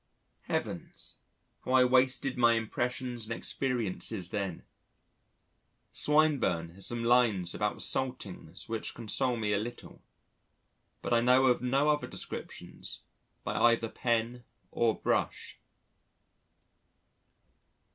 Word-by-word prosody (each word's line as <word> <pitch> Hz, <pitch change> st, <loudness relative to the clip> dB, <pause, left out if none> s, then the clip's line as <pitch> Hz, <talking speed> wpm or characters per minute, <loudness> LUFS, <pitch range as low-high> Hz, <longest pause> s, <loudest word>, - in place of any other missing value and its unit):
Heavens! -, -, -4 dB, 0.4 s
how 130 Hz, -, -2 dB
I 130 Hz, -1 st, +7 dB
wasted 130 Hz, +1 st, +3 dB
my 120 Hz, -1 st, +5 dB
impressions 120 Hz, +1 st, -2 dB
and 115 Hz, -, -3 dB
experiences 110 Hz, -8 st, -1 dB
then! 100 Hz, -5 st, -3 dB, 1.3 s
Swinburne 145 Hz, -, +2 dB
has 100 Hz, +2 st, -4 dB
some 120 Hz, -1 st, -2 dB
lines 115 Hz, -7 st, +3 dB
about -, -, -1 dB
saltings 105 Hz, -11 st, -3 dB
which 115 Hz, -1 st, -4 dB
console 120 Hz, +2 st, 0 dB
me 105 Hz, -2 st, 0 dB
a 100 Hz, -, +2 dB
little, 120 Hz, +3 st, -8 dB, 1.0 s
but -, -, -1 dB
I 115 Hz, -, +4 dB
know 125 Hz, +2 st, +5 dB
of 125 Hz, -2 st, +3 dB
no 135 Hz, +4 st, +2 dB
other 150 Hz, -1 st, +2 dB
descriptions -, -, -7 dB, 0.4 s
by -, -, -2 dB
either 115 Hz, -1 st, +3 dB
pen 120 Hz, +1 st, -1 dB, 0.3 s
or 115 Hz, -2 st, +2 dB
brush. -, -, -1 dB
120 Hz, 105 wpm, -30 LUFS, 110-125 Hz, 1.3 s, I